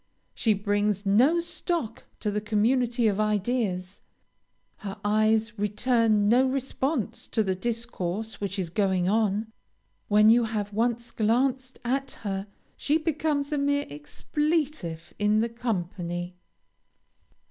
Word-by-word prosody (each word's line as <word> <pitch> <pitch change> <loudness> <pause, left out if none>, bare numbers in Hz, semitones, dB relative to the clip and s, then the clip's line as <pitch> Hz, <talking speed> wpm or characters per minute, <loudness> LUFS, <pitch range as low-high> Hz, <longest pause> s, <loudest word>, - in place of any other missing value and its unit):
She 220 -3 +2
brings 205 0 0
no 250 +12 +4
stock 335 - -3 0.2
to 210 - 0
the 210 +1 -1
community 235 +3 +1
of 210 -2 +2
ideas. 210 -3 -1 0.8
Her 195 -2 -7
eyes 215 +1 +2
return 215 0 +2
no 250 +4 +5
response 260 -3 -2
to 220 - +1
the 190 -2 0
discourse 220 -1 -4
which 200 0 -3
is 180 -4 -3
going 190 -2 +1
on. 215 +1 +1 0.6
When 210 +1 +6
you 235 +1 +5
have 210 -2 -3
once 235 +2 0
glanced 255 +4 0
at 270 +2 -1
her, 195 -1 -3 0.3
she 295 +2 +1
becomes 310 -2 -1
a 295 - +1
mere 285 0 +1
expletive 260 - -2
in 210 +1 +3
the 230 - 0
company. 180 -6 -3
220 Hz, 125 wpm, -27 LUFS, 205-250 Hz, 0.8 s, When